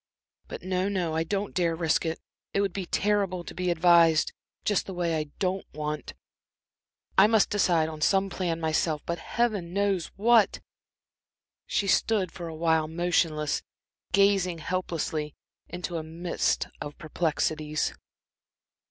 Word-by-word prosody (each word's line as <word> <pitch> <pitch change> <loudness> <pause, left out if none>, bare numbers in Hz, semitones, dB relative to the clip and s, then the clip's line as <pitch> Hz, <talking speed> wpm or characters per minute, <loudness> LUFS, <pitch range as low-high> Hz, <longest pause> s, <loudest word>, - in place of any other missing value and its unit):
But - - -8
no, 185 +1 0
no, 180 -5 -1
I 160 +1 +1
don't 200 +4 -2
dare 170 -2 +1
risk 165 0 +1
it; 160 - -3 0.4
it 200 - +3
would 195 -3 0
be 190 -2 -4
terrible 200 -3 0
to - - -8
be 180 0 -1
advised 170 -2 +5 0.3
just 205 -3 +1
the 190 - -6
way 170 -2 0
I 155 -1 -1
don't 190 0 -2
want. 150 0 -4 1.0
I 195 - +8
must 220 -1 +3
decide 175 -6 +3
on 155 -1 -7
some 195 +4 +3
plan 175 -4 -2
myself. 155 -1 0
But 170 0 -3
Heaven 205 -5 -1
knows 200 -4 +1
what!" 225 +1 +4 1.1
She 200 - 0
stood 195 -1 +2
for 170 -2 -7
a 160 - -6
while 160 -1 +2
motionless, 160 -3 0 0.5
gazing 195 -3 +3
helplessly 160 -3 -3 0.3
into 175 0 -4
a 160 - -3
mist 170 +2 -1
of 145 - -6
perplexities. 155 -2 -1
175 Hz, 145 wpm, -27 LUFS, 160-195 Hz, 1.1 s, I